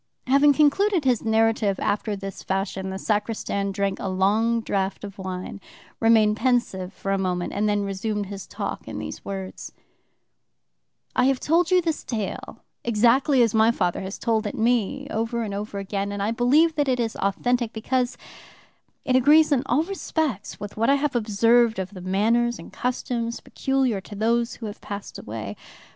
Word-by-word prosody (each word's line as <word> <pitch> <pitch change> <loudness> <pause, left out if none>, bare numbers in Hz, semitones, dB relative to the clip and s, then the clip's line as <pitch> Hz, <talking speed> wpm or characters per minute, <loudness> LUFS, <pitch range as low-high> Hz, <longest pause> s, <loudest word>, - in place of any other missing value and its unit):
Having 280 +3 +5
concluded 315 +4 +3
his 250 -4 +2
narrative 220 -3 +2
after 210 0 -1
this 195 -1 -7
fashion, 190 0 -2
the 190 - -4
sacristan 205 -1 -1
drank 195 0 -1
a - - -3
long 210 +5 +2
draught 195 -2 -2
of 200 -1 -8
wine, 185 +1 -6 0.4
remained 220 -2 +4
pensive 235 -8 0
for 195 - -4
a 195 - +1
moment, 180 -2 -2
and 210 +1 +1
then 205 -1 +1
resumed 200 +1 -2
his 195 0 -8
talk - - -5
in - - -6
these - - -6
words: 195 -1 -6 1.4
"I 250 - +3
have 270 -1 +2
told 330 +2 +2
you 365 -1 +4
this 325 -2 -2
tale 215 -5 -5 0.2
exactly 240 +4 +4
as 230 - +1
my 220 0 +5
father 180 -7 0
has 190 +1 -6
told 225 -2 0
it - - -4
to - - -8
me 245 +4 +1
over 230 +1 -1
and 205 -2 -4
over 205 0 -5
again, 200 0 -3
and 200 0 -3
I 210 - 0
believe 280 +8 +3
that 290 -2 +2
it 250 -1 +1
is 230 -2 -1
authentic, 235 +4 0
because 245 +3 -1 0.9
it 255 - +2
agrees 300 +5 +6
in 275 -4 +3
all 270 +6 +2
respects 315 - -3
with 205 0 -8
what 230 +3 +2
I 280 - +6
have 285 -1 -1
observed 230 +1 +3
of 190 0 -4
the 185 - -9
manners 230 +6 +1
and - - -12
customs 240 -2 -2
peculiar 265 -7 -1
to 205 - -10
those 230 +3 +1
who 230 - -8
have 210 -1 -7
passed 200 0 -7
away. 105 -2 -6
220 Hz, 180 wpm, -24 LUFS, 200-250 Hz, 1.4 s, agrees